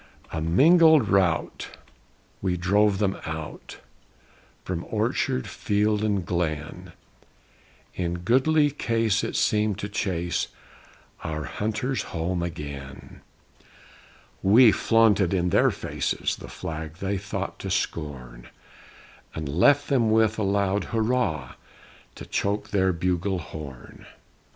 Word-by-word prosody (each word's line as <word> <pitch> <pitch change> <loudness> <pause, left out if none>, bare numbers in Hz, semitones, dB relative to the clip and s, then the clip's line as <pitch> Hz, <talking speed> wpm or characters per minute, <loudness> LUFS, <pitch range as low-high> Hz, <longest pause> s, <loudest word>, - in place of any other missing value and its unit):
A 80 - -3
mingled 155 - +5
rout, 95 -4 0 0.6
we 90 -2 0
drove 100 +3 +2
them 100 -1 0
out 80 -1 -7 0.9
From 90 -2 -3
orchard, 65 - -1
field, 105 +1 0
and 100 -4 0
glen; 80 -4 -3 1.0
In 85 -1 -2
goodly 145 +6 +3
case 115 -6 0
it - - -3
seemed 105 -2 +1
to 105 - -4
chase 90 -4 -2 0.8
Our 75 -1 -3
hunters 110 - -2 0.2
home 85 +2 -1
again! 70 -5 -7 1.2
We 110 +4 +7
flaunted 105 -4 +3
in 90 -1 0
their - - +4
faces - - -2
The - - -11
flag 80 -1 -6
they 95 +2 -2
thought 100 0 -5
to 95 - -5
scorn, 65 -10 -4 0.9
And 80 -2 -4
left 140 - +3
them 125 -6 +2
with 110 0 +3
a - - 0
loud 100 0 +1
"Hurrah!" 110 - -1 0.6
To - - -9
choke 100 +1 -2
their 95 -2 +2
bugle 90 +2 -1
horn! 75 -6 -10
95 Hz, 110 wpm, -25 LUFS, 85-110 Hz, 1.2 s, We